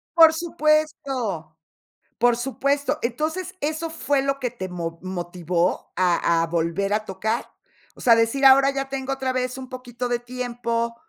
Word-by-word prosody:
Por 325 Hz, -1 st, +8 dB
supuesto. 305 Hz, -, 0 dB, 0.6 s
Por 240 Hz, 0 st, +3 dB
supuesto. 275 Hz, +3 st, 0 dB
Entonces, 315 Hz, +10 st, -2 dB
¿eso 315 Hz, +2 st, -2 dB
fue 290 Hz, -4 st, 0 dB
lo 275 Hz, 0 st, -1 dB
que 245 Hz, -3 st, -2 dB
te 185 Hz, -6 st, -6 dB
mo 165 Hz, -2 st, -5 dB
motivó 175 Hz, -1 st, -2 dB
a 170 Hz, -2 st, +2 dB
a -, -, -1 dB
volver 170 Hz, +4 st, 0 dB
a 215 Hz, 0 st, 0 dB
tocar? 220 Hz, +5 st, -2 dB, 0.5 s
O -, -, -13 dB
sea, 235 Hz, -, +6 dB
a -, -, +6 dB
decir, 230 Hz, +5 st, +2 dB
ahora 270 Hz, +1 st, +8 dB
ya 275 Hz, 0 st, -3 dB
tengo 270 Hz, 0 st, -3 dB
otra 265 Hz, -1 st, -2 dB
vez 255 Hz, 0 st, -2 dB
un 260 Hz, -1 st, -7 dB
poquito 250 Hz, -1 st, -5 dB
de 240 Hz, -1 st, 0 dB
tiempo, 240 Hz, -1 st, -3 dB
245 Hz, 160 wpm, -23 LUFS, 195-275 Hz, 0.6 s, Por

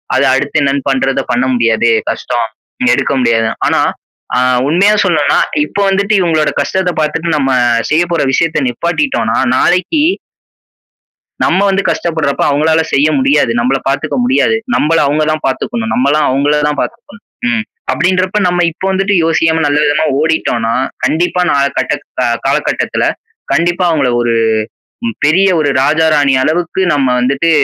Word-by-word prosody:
அது -, -, +2 dB
அடுத்து 145 Hz, +3 st, 0 dB
என்ன 135 Hz, -1 st, +1 dB, 0.2 s
பண்றத 135 Hz, 0 st, 0 dB
பண்ண 120 Hz, +2 st, +1 dB
முடியாதே! 115 Hz, -1 st, +2 dB, 0.2 s
கஷ்டம், 120 Hz, -2 st, -2 dB, 0.3 s
இனி 255 Hz, -, +3 dB
எடுக்க -, -, -1 dB
முடியாது. 115 Hz, -2 st, +1 dB, 0.2 s
ஆனா -, -, +1 dB, 0.6 s
ஆ -, -, +3 dB, 0.3 s
உண்மையா 195 Hz, +7 st, +3 dB
சொல்லனுன்னா, 160 Hz, -6 st, +1 dB, 0.3 s
இப்ப 200 Hz, -, -6 dB
வந்துட்டு 200 Hz, +2 st, 0 dB
இவுங்களோட 160 Hz, -4 st, +1 dB
கஷ்டத்த 190 Hz, -1 st, -1 dB
பாத்துட்டு 155 Hz, +2 st, -1 dB
நம்ம 135 Hz, -2 st, 0 dB, 0.4 s
செய்ய 160 Hz, +3 st, +2 dB
போற 170 Hz, -, 0 dB
விஷயத்த 165 Hz, +3 st, 0 dB
நிப்பாட்டிட்டோன்னா 175 Hz, -, -1 dB, 0.2 s
நாளைக்கி 185 Hz, -, +1 dB, 1.4 s
நம்ம -, -, +2 dB
வந்து 195 Hz, +1 st, 0 dB
கஷ்டப்படுறப்ப 160 Hz, -5 st, -1 dB
அவுங்களால 160 Hz, +3 st, +2 dB
செய்ய 145 Hz, +3 st, +3 dB
முடியாது. 135 Hz, -1 st, +2 dB
நம்பள 125 Hz, +3 st, +1 dB
பாத்துக்க 140 Hz, +1 st, -2 dB
முடியாது. 245 Hz, -3 st, +2 dB, 0.2 s
நம்பள 165 Hz, +2 st, +1 dB
அவுங்க 150 Hz, +2 st, +1 dB
தான் 155 Hz, -, -5 dB
பாத்துக்கணும், 225 Hz, -, -3 dB
நம்மலாம் 145 Hz, +3 st, +1 dB
அவுங்களதான் 145 Hz, +2 st, 0 dB
பாத்துக்கணும். 230 Hz, -4 st, -7 dB, 0.2 s
ம். 230 Hz, -2 st, 0 dB, 0.3 s
அப்பிடின்றப்ப 185 Hz, +4 st, 0 dB
நம்ம 175 Hz, 0 st, +1 dB
இப்போ 190 Hz, +4 st, -6 dB
வந்துட்டு 195 Hz, +1 st, 0 dB
யோசிக்காம 160 Hz, 0 st, +1 dB
நல்ல 145 Hz, 0 st, +1 dB
விதமா 155 Hz, +2 st, +1 dB
ஓடிட்டோன்னா, 120 Hz, -8 st, 0 dB, 0.3 s
கண்டிப்பா 175 Hz, +3 st, 0 dB
நாள 140 Hz, -1 st, +2 dB, 0.2 s
கட்டத் -, -, -2 dB, 0.4 s
காலகட்டத்துல, -, -, -1 dB, 0.5 s
கண்டிப்பா 175 Hz, +2 st, +1 dB
அவுங்கள 140 Hz, -6 st, +1 dB
ஒரு 120 Hz, -1 st, 0 dB, 0.9 s
பெரிய 190 Hz, +6 st, +3 dB
ஒரு 145 Hz, -2 st, +1 dB
ராஜா, 160 Hz, +3 st, +2 dB
ராணி 140 Hz, -2 st, +2 dB
அளவுக்கு 175 Hz, +4 st, -1 dB
நம்ம 140 Hz, -2 st, +1 dB
வந்துட்டு, 140 Hz, +6 st, +1 dB
155 Hz, 140 wpm, -13 LUFS, 140-180 Hz, 1.4 s, இனி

